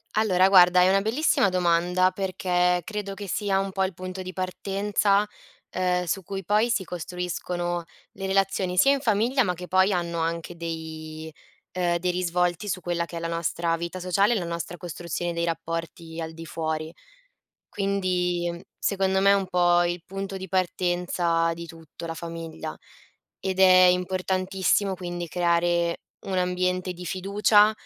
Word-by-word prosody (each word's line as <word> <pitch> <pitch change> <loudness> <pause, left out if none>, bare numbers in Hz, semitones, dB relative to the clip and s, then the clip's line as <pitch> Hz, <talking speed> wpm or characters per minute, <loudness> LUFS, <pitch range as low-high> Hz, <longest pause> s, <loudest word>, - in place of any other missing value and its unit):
Allora 190 -3 +4
guarda 180 -1 +7
è 180 - +5
una 195 +1 +4
bellissima 225 -1 +2
domanda 180 0 +2
perché 180 -2 +1
credo 210 -2 -5
che 200 0 -7
sia 195 +1 0
un 195 0 -2
po' 190 0 0
il 190 -1 -1
punto 185 +1 -6
di 185 0 -7
partenza, 200 +2 0 0.4
ehm, 180 -1 0
su 190 +3 -2
cui 195 +1 -5
poi 215 +5 +2
si 215 -4 +1
costruiscono 175 0 -3 0.3
le 195 - -6
relazioni, 190 -1 0
sia 275 +9 +6
in 280 - 0
famiglia 240 +2 +2
ma 180 -4 0
che 180 +1 -8
poi 190 +2 +3
hanno 170 -1 -2
anche 165 +1 -2
dei 160 -1 -6 0.4
ehm, 175 -1 0
dei 180 - -1
risvolti 180 +1 0
su 185 -1 -2
quella 170 -1 -1
che 170 0 -8
è - - -3
la 165 - -3
nostra 165 0 -1
vita 170 +2 -5
sociale 195 +5 +2
e 220 - +1
la 175 - -4
nostra 170 +1 -5
costruzione 175 0 -4
dei 170 0 -1
rapporti 165 0 -4
al 160 0 -5
di 165 0 -9
fuori. 160 0 -3 0.8
Quindi, 185 -3 0
ehm, 170 - -8 0.2
secondo 190 -1 +1
me 200 +1 +5
è - - +6
un 195 -1 0
po' 175 -1 +3
il 175 0 -2
punto 195 0 -5
di 190 0 -7
partenza 175 -2 0
di 170 0 -7
tutto 165 0 -11
la 165 - -4
famiglia 165 -1 -6 0.6
ed 190 -1 -2
è 185 -1 +8
importantissimo 185 +2 +1
quindi 175 -1 -5
creare 170 0 +1 0.2
un 190 -1 -2
ambiente 180 0 0
di 180 0 -9
fiducia, 205 +3 +4
180 Hz, 165 wpm, -25 LUFS, 170-190 Hz, 0.8 s, è